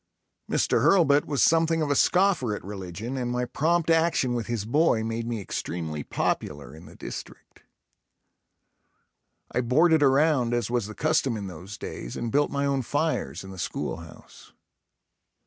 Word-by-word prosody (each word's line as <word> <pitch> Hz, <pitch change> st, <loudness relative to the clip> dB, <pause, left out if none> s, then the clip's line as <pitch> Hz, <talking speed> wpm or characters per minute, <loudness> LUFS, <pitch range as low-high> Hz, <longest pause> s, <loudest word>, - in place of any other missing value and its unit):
Mr. -, -, +2 dB
Hurlbut 150 Hz, -7 st, +4 dB
was 140 Hz, -4 st, +1 dB
something 165 Hz, 0 st, +3 dB
of 145 Hz, -, -1 dB
a -, -, +2 dB
scoffer 180 Hz, -, +3 dB
at -, -, -8 dB
religion 100 Hz, +5 st, -6 dB
and 125 Hz, -2 st, -2 dB
my 125 Hz, 0 st, -1 dB
prompt 165 Hz, +6 st, +1 dB
action 165 Hz, -6 st, +2 dB
with 120 Hz, -2 st, -3 dB
his 115 Hz, -4 st, -2 dB
boy 120 Hz, -2 st, +2 dB
made 115 Hz, +1 st, -3 dB
me 115 Hz, -2 st, -2 dB
extremely 80 Hz, -5 st, -4 dB
popular 75 Hz, +1 st, -3 dB
in 80 Hz, +3 st, -13 dB
the -, -, -14 dB
district. -, -, -9 dB, 1.9 s
I 125 Hz, -, 0 dB
boarded 155 Hz, +6 st, +4 dB
around 135 Hz, -3 st, +3 dB
as 120 Hz, -1 st, -2 dB
was 120 Hz, -4 st, 0 dB
the 110 Hz, -, -9 dB
custom 150 Hz, -6 st, +1 dB
in 100 Hz, -, -5 dB
those 95 Hz, +2 st, -8 dB
days -, -, -7 dB
and 115 Hz, -1 st, -3 dB
built 145 Hz, +3 st, +2 dB
my 140 Hz, 0 st, -1 dB
own 140 Hz, -1 st, +1 dB
fires 130 Hz, -, -2 dB
in 95 Hz, -, -9 dB
the 95 Hz, -, -10 dB
schoolhouse. 80 Hz, -1 st, -7 dB
125 Hz, 160 wpm, -26 LUFS, 105-150 Hz, 1.9 s, Hurlbut